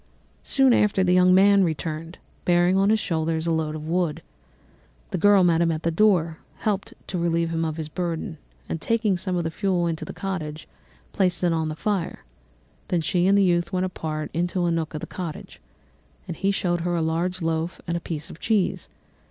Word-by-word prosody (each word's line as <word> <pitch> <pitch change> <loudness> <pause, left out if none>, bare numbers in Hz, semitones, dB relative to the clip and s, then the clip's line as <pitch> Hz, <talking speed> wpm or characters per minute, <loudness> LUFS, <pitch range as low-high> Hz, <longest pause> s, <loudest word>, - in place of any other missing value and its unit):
"Soon 270 -2 +4
after 205 -4 +3
this 180 - +1
the - - +5
young 180 0 +5
man 200 +1 +6
returned, 165 0 -3 0.3
bearing 175 +1 +3
on 195 +1 +3
his 220 0 +3
shoulders 160 -3 -1
a 170 - +1
load 160 -1 -1
of 155 0 -7
wood. 170 -2 -1 0.9
The - - -1
girl 205 +1 +6
met 170 -2 +3
him 170 -1 +3
at 160 0 -3
the 170 - +1
door, 165 -4 +2 0.2
helped 200 -2 -2
to 180 - -3
relieve 170 -1 0
him 165 0 -1
of 160 -1 -2
his 160 -2 -4
burden, 170 0 -4 0.3
and 165 - -4
taking 225 -4 +1
some 180 0 -2
of 170 - 0
the 160 - -2
fuel 185 -1 0
into 165 -1 -2
the - - -6
cottage, 160 -6 -5 0.5
placed 180 -2 +1
it 175 -1 +3
on 160 -1 -1
the 155 - -4
fire; 195 +1 -2 0.6
then 175 -2 0
she 175 +3 +1
and 200 +1 +5
the 200 - +5
youth 175 -1 +1
went 185 -1 0
apart 155 -4 -4
into 175 +2 0
a 170 - +1
nook 165 -1 -2
of 150 - -4
the - - -4
cottage, 170 - -7 0.7
and 170 - -5
he 195 - 0
showed 175 -3 0
her 175 +1 -1
a 170 - 0
large 170 +3 -1
loaf 165 +1 -2
and 170 - -2
a - - 0
piece 155 -3 -5
of - - -12
cheese. 215 -4 0
175 Hz, 210 wpm, -24 LUFS, 160-185 Hz, 0.9 s, man